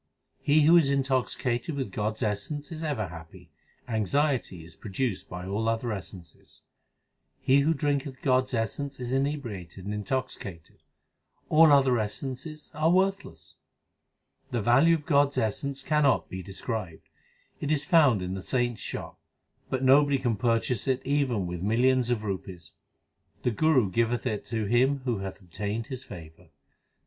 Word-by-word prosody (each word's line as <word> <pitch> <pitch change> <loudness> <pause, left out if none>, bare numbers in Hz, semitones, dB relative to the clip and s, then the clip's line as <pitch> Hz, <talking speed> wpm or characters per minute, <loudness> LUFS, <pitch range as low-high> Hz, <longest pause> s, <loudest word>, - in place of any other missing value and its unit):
He 150 +2 +4
who 165 +3 +7
is 155 -5 +4
intoxicated 130 0 0
with 130 -8 -3
God 105 +2 -1
s 115 - -5
essence 110 +9 -3
is 160 -1 -6
ever 135 - -2
happy; 80 -1 -12 0.4
Anxiety 115 - 0
is 85 0 -12
produced 110 +1 -3
by 90 0 -6
all 105 +4 -1
other 115 +1 -1
essences. 90 -4 -9 0.8
He 135 +2 +4
who 155 +3 +2
drinketh 140 -2 -2
God 130 -1 +3
s 130 - -4
essence 135 +5 -3
is 125 0 -3
inebriated 120 - -3
and 105 - -3
intoxi 130 +6 -2
cated; 85 -8 -10 0.7
All 160 0 +7
other 135 -4 +5
essences 135 +8 -5
are 155 +1 +2
worthless. 195 +2 0 0.9
The 120 - -1
value 135 +10 +5
of 150 -3 -6
God 145 -2 +4
s 140 - -10
essence 135 +6 -1
cannot 150 -4 +2
be 95 - -5
described: 95 -1 -6 0.5
It 145 - -2
is 150 -1 +1
found 145 - +4
in 90 +1 -3
the 95 - -4
saints 120 +1 -1
shop; - - -6 0.5
But 130 0 -1
nobody 140 +1 +5
can 120 -4 0
purchase 115 +1 0
it 130 -1 0
even 130 -8 +1
with 90 -1 -5
millions 120 +4 +2
of 120 -3 0
rupees. 95 -4 -6 0.7
The 125 - +2
Guru 130 -5 +3
giveth 115 +4 0
it 110 -5 -2
to 110 -2 -2
him 130 +6 +2
who 120 -5 0
hath 95 -1 -6
obtained 100 +5 -4
his 130 - -4
favour. 80 -1 -12
125 Hz, 155 wpm, -27 LUFS, 105-140 Hz, 0.9 s, who